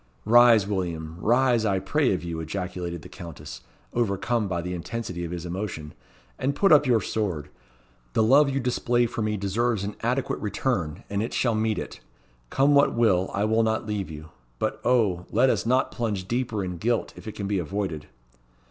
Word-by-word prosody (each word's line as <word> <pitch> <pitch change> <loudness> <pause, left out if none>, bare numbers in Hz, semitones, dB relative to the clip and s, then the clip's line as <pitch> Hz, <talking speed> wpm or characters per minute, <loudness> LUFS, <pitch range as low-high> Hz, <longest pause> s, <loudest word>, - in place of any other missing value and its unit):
"Rise, 115 -2 +6
William! 85 -5 -3
rise, 120 +1 +3
I 100 -3 +1
pray 130 +9 +1
of 90 -2 -1
you," 85 -1 -4
ejaculated 85 -1 -4
the - - -9
Countess, 85 -4 -9 0.3
overcome 115 0 0
by 90 -2 -2
the 90 +1 -4
intensity 90 0 -5
of 85 - -4
his 90 -1 -5
emotion, 85 -4 -5 0.5
"and 140 +2 0
put 195 +5 +3
up 150 -2 +6
your 120 -3 +3
sword. 90 -9 -2 0.6
The 110 - +3
love 140 +6 +5
you 135 0 -1
display 120 -1 +1
for 115 0 -4
me 105 0 0
deserves 105 +2 0
an 100 +1 -4
adequate 125 +3 -1
return, 100 - -2
and 100 0 -2
it 115 - -3
shall 120 -3 +2
meet 110 0 0
it. - - -6 0.5
Come 140 +2 +3
what 140 -3 +4
will, 95 -6 +3
I 100 - -1
will 110 +1 +2
not 110 0 0
leave 105 -4 -3
you. 80 0 -9 0.3
But, - - -2
O! 105 -8 +2
let 125 +4 +4
us - - -1
not 130 +2 +2
plunge 105 -6 -3
deeper 115 -3 -1
in 90 -1 -5
guilt 115 +5 -1
if - - -12
it 110 - -6
can 100 - -4
be 100 -1 0
avoided." 85 -3 -3
105 Hz, 190 wpm, -25 LUFS, 90-120 Hz, 0.6 s, Rise